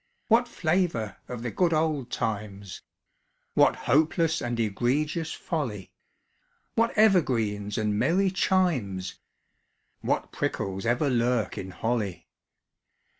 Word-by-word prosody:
_) - - -46 0.3
What 235 +2 +4
flavour 165 - 0
of 120 -2 -6
the 120 - -3
good 175 -3 +2
old 155 -5 0
times! 100 -5 -4 0.7
(What - - +4
hopeless 160 +3 +2
and 120 -1 -2
egregious 140 - 0
folly!) 125 - -4 0.8
What 230 +1 +3
evergreens 115 - +2
and 105 -1 0
merry 190 +3 +2
chimes! 125 - 0 0.8
(_What - - -1
prickles 95 +3 -2
ever 120 +5 +2
lurk 120 -3 +1
in 95 - -6
holly! 110 -1 -2
125 Hz, 110 wpm, -27 LUFS, 105-165 Hz, 0.8 s, What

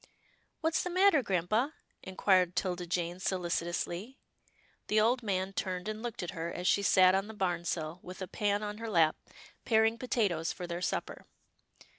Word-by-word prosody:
"What's 320 0 +1
the 360 - -3
matter, 370 -4 +5
grampa?" 215 - 0 0.3
inquired 185 -1 +2
'Tilda 180 -2 -2
Jane 175 +1 -2
solicitously. 180 +4 -2 0.7
The 215 - +3
old 240 +4 +3
man 195 -3 -1
turned 185 0 -3
and 215 0 -4
looked 235 -5 -4
at 175 - -4
her, 165 +1 -4
as 180 - -5
she 200 - +4
sat 185 -2 +5
on 195 +2 +1
the 220 - -9
barn 175 -4 -1
sill, 160 0 -3
with 180 +1 -10
a 185 - -4
pan 205 +2 0
on 210 0 -5
her 230 0 -4
lap, 165 -5 +4 0.5
paring 225 0 +3
potatoes 205 -10 0
for 180 - -6
their 175 0 -4
supper. - - -3
190 Hz, 170 wpm, -31 LUFS, 175-220 Hz, 0.7 s, matter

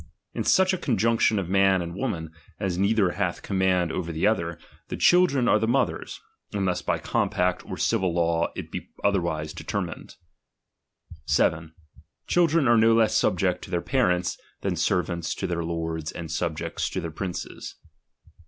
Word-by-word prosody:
In - - -2
such 190 0 +4
a 185 - -2
conjunction 115 -2 +2
of 95 -3 -2
man 95 0 +4
and 85 -1 -4
woman, 85 -7 -3 0.3
as 95 -2 -1
neither 100 0 +2
hnlh - - -2
command 95 -3 +1
over 85 -1 -3
the 80 +3 -1
other, 85 -6 +1 0.3
the - - -5
children 175 -9 +4
are 105 - +4
the 110 - 0
mother's, 125 +2 -1 0.3
unless 95 -3 0
by - - 0
compact 90 0 0
or - - -5
civil 95 -6 +1
law 85 -1 +1
it - - -7
be - - -6
otherwise 85 -6 0
determined. - - -5 1.1
7. 80 0 +1 0.5
Chil 175 -1 +3
dren 160 -3 +2
are 120 0 +5
no 115 +1 +5
less 110 -1 +3
subject 90 -3 +1
to - - -9
their 90 -2 0
parents, 90 -10 +1 0.2
than - - -1
servants 85 -2 -1
to - - -4
their 85 -1 -2
lords 80 -1 -3
and 85 -2 -7
subjects 80 -1 -2
to - - -3
their 85 - -5
princes. 90 +3 -6
90 Hz, 160 wpm, -25 LUFS, 85-110 Hz, 1.1 s, are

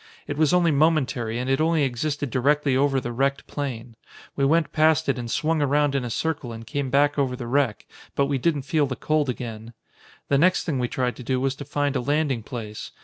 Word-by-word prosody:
It 145 - -4
was 155 0 +3
only 175 -2 +4
momentary 140 -6 +1
and 125 +1 -3
it 135 +2 +1
only 160 -1 +2
existed 140 +1 -2
directly 140 +2 +2
over 135 0 +2
the 120 -1 -5
wrecked 135 +3 0
plane. 125 -5 -5 0.4
We 140 - 0
went 160 +4 +2
past 160 0 +3
it 135 -2 0
and 120 -1 -5
swung 155 +5 0
around 145 0 +2
in 135 -2 0
a 120 - -4
circle 145 -1 -2
and 115 0 -8
came 140 +2 -3
back 145 +2 +2
over 130 -2 0
the 125 -1 -6
wreck, 130 -2 0 0.3
but 140 - +2
we 140 -1 -1
didn't 145 0 0
feel 150 0 +1
the 130 - -3
cold 155 -1 0
again. 115 -2 -6 0.5
"The 140 - +2
next 180 +4 +3
thing 150 -6 -2
we 125 - 0
tried 125 0 -1
to 125 - -8
do 130 +1 0
was 135 0 0
to 145 - -7
find 145 0 -1
a - - +1
landing 145 -2 0
place. 110 -2 -7
140 Hz, 225 wpm, -24 LUFS, 125-150 Hz, 0.5 s, only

